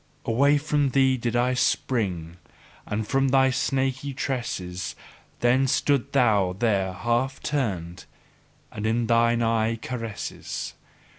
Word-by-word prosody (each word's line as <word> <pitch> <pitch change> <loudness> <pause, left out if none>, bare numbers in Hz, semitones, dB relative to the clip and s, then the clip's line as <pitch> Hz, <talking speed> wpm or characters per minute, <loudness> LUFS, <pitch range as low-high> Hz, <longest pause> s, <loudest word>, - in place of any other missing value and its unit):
Away 140 +6 +3
from 145 -1 +1
thee 130 0 +3
did 120 -1 -2
I 125 +1 +2
spring, 90 -10 -1 0.5
and 105 +1 -2
from 135 0 +2
thy 135 0 +4
snaky 130 +1 -1
tresses: 95 -10 -3 0.5
then 130 +3 +3
stoodst 140 0 +1
thou 100 -6 +3
there 100 -4 +1
half 120 +6 -1
turned, 95 - -2 0.7
and 105 +1 -3
in 115 +1 +1
thine 115 0 +3
eye 115 0 +1
caresses. 115 -2 -5
120 Hz, 120 wpm, -25 LUFS, 110-130 Hz, 0.7 s, thy